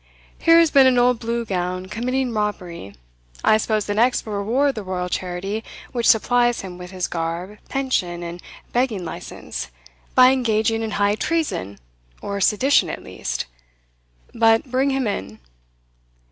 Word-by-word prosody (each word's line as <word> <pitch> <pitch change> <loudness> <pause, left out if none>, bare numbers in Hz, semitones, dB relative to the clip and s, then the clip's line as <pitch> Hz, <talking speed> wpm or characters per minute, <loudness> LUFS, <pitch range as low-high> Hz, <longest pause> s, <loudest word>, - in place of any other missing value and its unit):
Here 330 0 +6
has 335 -2 +5
been 270 -2 +7
an 255 -1 +3
old 245 -1 +3
Blue 235 +1 -2
Gown 185 -2 -2
committing 245 +5 -2
robbery 180 - -4 0.5
I 215 - +5
suppose 215 -1 0
the 205 - -1
next 240 +4 +2
will 215 - -5
reward 245 +8 +1
the 220 - -5
royal 185 -2 -3
charity 190 +5 -3 0.3
which 235 -2 0
supplies 240 +1 +3
him 180 -2 -8
with 180 0 -8
his 185 -1 -3
garb, 170 +5 -4
pension, 185 -11 -1
and 170 +1 -7 0.3
begging 235 -7 0
license, - - -6 0.5
by 255 0 +8
engaging 225 -3 +1
in 225 - -2
high 205 0 +3
treason, 215 - -2 0.4
or 200 0 -4
sedition 260 +9 +3
at - - -6
least - - -4 0.9
But 225 +2 +3
bring 265 +2 +2
him 270 -1 0
in." 105 - -4
215 Hz, 150 wpm, -22 LUFS, 185-250 Hz, 0.9 s, by